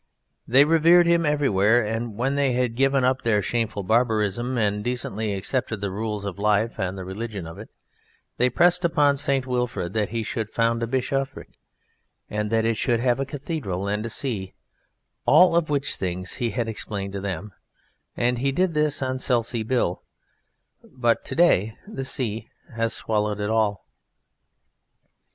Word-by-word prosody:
They 135 +4 +6
revered 165 +2 +5
him 170 -1 +3
everywhere, 120 -6 +3
and 115 0 -3
when 130 +4 0
they 140 -2 +1
had 125 -1 0
given 135 +1 +2
up 130 +1 +2
their 115 -3 +2
shameful 110 -2 -2
barbarism 115 +2 +1
and 105 -2 0
decently 110 -3 -2
accepted 110 +2 -2
the 100 -1 -3
rules 105 0 -3
of 100 -1 -5
life 105 +2 +1
and 95 +1 -2
the 95 - -6
religion 100 -1 -5
of 80 0 -9
it, - - -10 0.7
they 125 +1 +3
pressed 175 +7 +3
upon 150 -4 +3
St. 135 -1 +1
Wilfrid 125 -8 -2
that 105 -2 0
he 115 0 -2
should 110 0 -3
found 115 0 0
a 115 - -1
bishopric, 135 +2 -2 0.8
and 105 0 -2
that 115 0 +2
it 115 -1 +1
should 120 +1 +1
have 125 +1 +1
a 135 - -2
cathedral 135 - -4
and 105 +1 -1
a 115 - -4
see 110 -6 -3 0.7
(all 180 -2 +6
of 170 -2 +2
which 145 -1 0
things 90 0 -4
he 120 - -1
had 115 +2 -2
explained 100 -3 -4
to 100 - -4
them), 100 +1 -4 0.7
and 120 0 +1
he 135 +2 +1
did 180 +4 +1
this 150 -2 +1
on 130 0 -2
Selsey 120 -2 0
Bill: 110 -6 0 0.8
but 120 -3 -1
to - - -5
day 110 - +3
the 135 -11 -5
sea 115 -4 -2 0.3
has 115 0 0
swallowed 105 -1 -1
all. 105 -1 0
115 Hz, 165 wpm, -24 LUFS, 105-135 Hz, 0.8 s, They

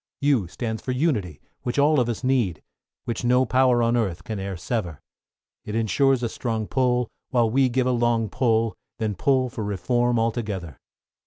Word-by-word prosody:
=U= 135 -10 +3
stands 110 +5 -4
for 130 - -2
Unity, 110 - -1 0.2
which 120 +1 -3
all 145 +1 +4
of 120 -1 +1
us 120 +2 -4
need, 120 -11 +1 0.4
Which 120 +1 -3
no 125 +2 +3
power 125 -1 +3
on 115 +1 +2
earth 100 -8 -1
can 110 -4 -5
e'er 95 -1 -4
sever; 85 - -3 0.6
It 105 - -5
ensures 125 +3 +2
a - - +1
strong 110 -2 -3
pull, 125 0 +1 0.2
while 120 -3 +2
we 130 +1 +3
give 125 +1 +1
a 130 - +2
long 120 -2 +1
pull, 115 -1 +1 0.2
Then 110 -2 -1
pull 130 +6 +2
for 115 -2 -5
Reform 120 +5 0
altogether. 105 - -2
120 Hz, 175 wpm, -24 LUFS, 105-125 Hz, 0.6 s, all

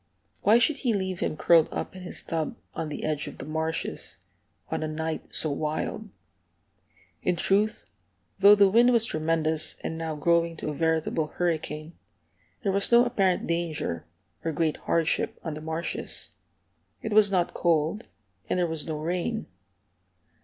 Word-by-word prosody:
Why 215 +3 +6
should 280 +5 +2
he 245 -4 0
leave 190 -3 -2
him 155 - -2
curled 165 -1 +5
up - - -4
in 185 - -8
his 180 - -3
tub 160 -2 -3 0.2
on 160 - -3
the 150 - -5
edge 150 -1 -1
of - - -8
the - - -6
marshes, 160 +2 -2 0.5
on - - -1
a 155 - -1
night 160 +1 -4
so 155 - +1
wild? 155 +8 -3 1.1
In 180 - +1
truth, 200 +5 +1 0.5
though 200 +1 +9
the 200 -1 +6
wind 235 +5 +5
was 230 -1 +3
tremendous, 155 -2 +1
and 160 - -4
now 160 -1 -3
growing 170 +2 +2
to - - -4
a - - -3
veritable 160 0 0
hurricane, 160 -1 -2 0.7
there 195 - +1
was 200 +3 +2
no 240 +1 +7
apparent 195 -7 +1
danger 165 - -2 0.4
or 165 - -1
great 160 0 0
hardship 165 -1 0
on 160 - -3
the 155 - -7
marshes. 160 +2 -3 0.7
It 220 - -2
was 210 -1 +6
not 180 -3 +1
cold, 165 +5 +1 0.4
and - - +1
there 180 - +2
was 160 -2 -4
no 155 -1 -2
rain. 180 +8 -2
165 Hz, 160 wpm, -27 LUFS, 155-195 Hz, 1.1 s, though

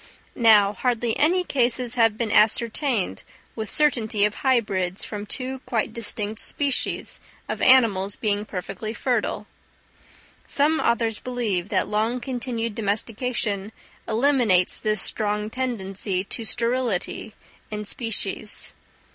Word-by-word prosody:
Now, 210 -4 +5
hardly 235 +1 0
any 355 +5 +3
cases 250 -5 +1
have 225 -3 +3
been 225 -2 -2
ascertained 225 - +2 0.3
with 220 -2 -4
certainty 225 -9 +2
of 210 - 0
hybrids 205 -9 0
from 210 -1 -6
two 260 +2 -3
quite 225 -1 -1
distinct 215 -1 -2
species 280 -3 -1 0.3
of - - -4
animals 205 -7 +5
being 205 -2 -1
perfectly 215 +2 -6
fertile. - - -1 1.0
Some 305 +3 +2
authors 230 -2 0
believe 220 -7 -2
that 190 -3 +1
long 220 +4 0
continued 240 -3 -3
domestication 215 -1 -2 0.4
eliminates 230 -6 +3
this 215 -1 +1
strong 210 0 -1
tendency 195 -7 -2
to 225 +3 -3
sterility 230 -3 -1 0.3
in 210 0 -5
species. 210 -2 0
225 Hz, 115 wpm, -24 LUFS, 205-245 Hz, 1.0 s, Now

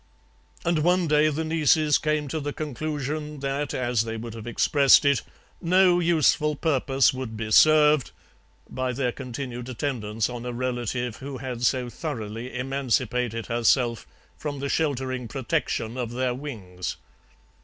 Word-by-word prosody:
"And 170 -1 +2
one 175 +2 +2
day 150 0 +4
the 155 +2 -2
nieces 155 -2 +3
came 150 -1 0
to 160 - -2
the 145 -1 -4
conclusion 150 0 -4
that, 140 +1 -2
as 120 -3 0
they 115 0 -4
would 115 0 -7
have 115 0 -8
expressed 140 +4 +4
it, 140 -3 +3 0.4
'no 180 +1 +4
useful 155 -3 +2
purpose 135 -3 +2
would 130 -4 -5
be 110 -1 -4
served' 150 +1 +6 0.6
by 130 0 -3
their 125 -1 0
continued 125 -1 -6
attendance 115 -5 -2
on 120 -1 -6
a 125 0 -4
relative 120 -1 -2
who 135 0 -7
had 125 -1 -5
so 125 0 +1
thoroughly 120 - -5
emancipated 125 -3 -1
herself 120 0 +1 0.3
from 145 -2 -5
the 140 +1 -3
sheltering 130 -5 -1
protection 130 -2 -2
of 120 -2 -2
their 125 0 0
wings. 105 -10 -6
130 Hz, 145 wpm, -25 LUFS, 120-150 Hz, 0.6 s, served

